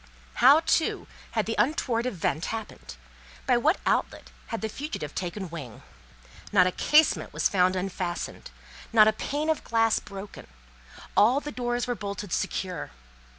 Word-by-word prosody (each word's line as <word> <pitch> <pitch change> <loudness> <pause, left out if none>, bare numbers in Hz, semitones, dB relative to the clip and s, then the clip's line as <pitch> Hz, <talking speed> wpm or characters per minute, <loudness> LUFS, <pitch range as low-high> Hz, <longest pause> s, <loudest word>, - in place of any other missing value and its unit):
How, - - +8
too, - - +1 0.3
had - - 0
the 225 - -2
untoward 250 -4 +1
event 165 - -1
happened? 220 - -6 0.5
By - - +3
what 305 +9 +2
outlet - - -1 0.2
had 225 - -4
the 220 - -1
fugitive 220 - -6
taken 185 +2 -4
wing? 140 -10 -8 0.7
Not 185 -3 +5
a 185 - +1
casement 300 - +3
was - - +2
found 185 -1 +2
unfastened, 185 -2 -4 0.4
not 215 -2 +7
a 220 - +4
pane 290 +7 -3
of 315 -2 0
glass 225 -1 +2
broken; 200 0 -10 0.7
all 245 +6 +5
the 295 0 -7
doors 240 -1 -2
were 245 - -1
bolted 200 -3 -5
secure. 180 -4 -2
215 Hz, 150 wpm, -27 LUFS, 185-245 Hz, 0.7 s, How